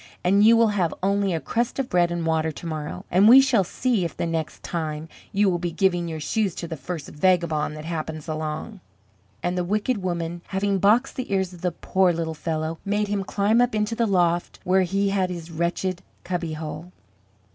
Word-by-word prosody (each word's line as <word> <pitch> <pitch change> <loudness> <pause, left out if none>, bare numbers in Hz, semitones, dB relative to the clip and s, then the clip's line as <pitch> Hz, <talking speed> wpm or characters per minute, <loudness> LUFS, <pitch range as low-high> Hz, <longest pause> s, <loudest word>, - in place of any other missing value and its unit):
And 200 +3 +4
you 230 +1 +7
will 230 -1 +5
have 185 -5 0
only 200 0 +2
a 165 - 0
crust 230 - -2
of 270 -2 -1
bread 175 -4 +2
and 170 -1 -2
water 160 0 +1
to 155 - -10
morrow. 155 -2 -5
And 195 +5 +6
we 255 +3 +10
shall 250 -7 +4
see 235 +2 0
if 170 - -4
the - - -1
next 160 -2 -3
time, 155 -2 -3 0.2
you 205 +1 +2
will 175 -2 +1
be 175 0 -2
giving 175 -1 +1
your 160 -1 -4
shoes 195 +4 -1
to 170 - -5
the 165 - -5
first 155 +1 -6
vagabond 160 -2 +1
that 155 - -8
happens 160 -2 -4
along." 155 +6 -4 0.6
And 175 +1 0
the 180 - 0
wicked 210 +4 0
woman 170 -1 -3
having 195 0 0
boxed 220 +7 +3
the 255 -5 -4
ears 190 -2 0
of 175 - -12
the 180 -1 0
poor 185 +2 +1
little 165 -1 -2
fellow, 160 +1 -3
made 205 +1 0
him 200 -1 -1
climb 205 +4 +2
up 245 -2 +1
into 210 +1 0
the 230 0 +1
loft 175 -3 +1
where 190 +1 +3
he 195 +2 +1
had 190 -2 +1
his 170 -2 -7
wretched 175 +2 -2 0.2
cubbyhole. 165 -1 -4
180 Hz, 205 wpm, -24 LUFS, 165-200 Hz, 0.6 s, we